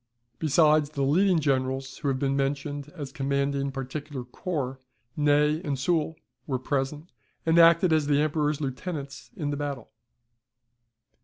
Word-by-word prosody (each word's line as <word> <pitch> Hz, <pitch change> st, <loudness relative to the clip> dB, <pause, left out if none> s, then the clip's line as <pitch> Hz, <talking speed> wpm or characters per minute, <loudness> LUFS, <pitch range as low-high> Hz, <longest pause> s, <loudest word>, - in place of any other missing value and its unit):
Besides 155 Hz, -1 st, +4 dB
the 145 Hz, -2 st, -2 dB
leading 180 Hz, +6 st, +3 dB
generals 135 Hz, -2 st, -1 dB
who -, -, -3 dB
have 135 Hz, -1 st, +1 dB
been 135 Hz, 0 st, 0 dB
mentioned 140 Hz, +1 st, -2 dB
as 145 Hz, -5 st, -6 dB
commanding 140 Hz, 0 st, -1 dB
particular 135 Hz, +1 st, -5 dB
corps, 130 Hz, 0 st, -4 dB, 0.4 s
Ney 150 Hz, +1 st, +3 dB
and 145 Hz, -5 st, -2 dB
Soult 160 Hz, +2 st, 0 dB, 0.3 s
were 135 Hz, -3 st, 0 dB
present, 140 Hz, +5 st, -3 dB, 0.3 s
and 165 Hz, +1 st, +4 dB
acted 170 Hz, +1 st, +6 dB
as 155 Hz, -2 st, +2 dB
the 145 Hz, -1 st, +3 dB
Emperor's 150 Hz, -1 st, +1 dB
lieutenants 140 Hz, 0 st, -5 dB
in 150 Hz, -7 st, -2 dB
the 145 Hz, -, -2 dB
battle. 140 Hz, -5 st, -5 dB
145 Hz, 140 wpm, -27 LUFS, 135-155 Hz, 0.4 s, acted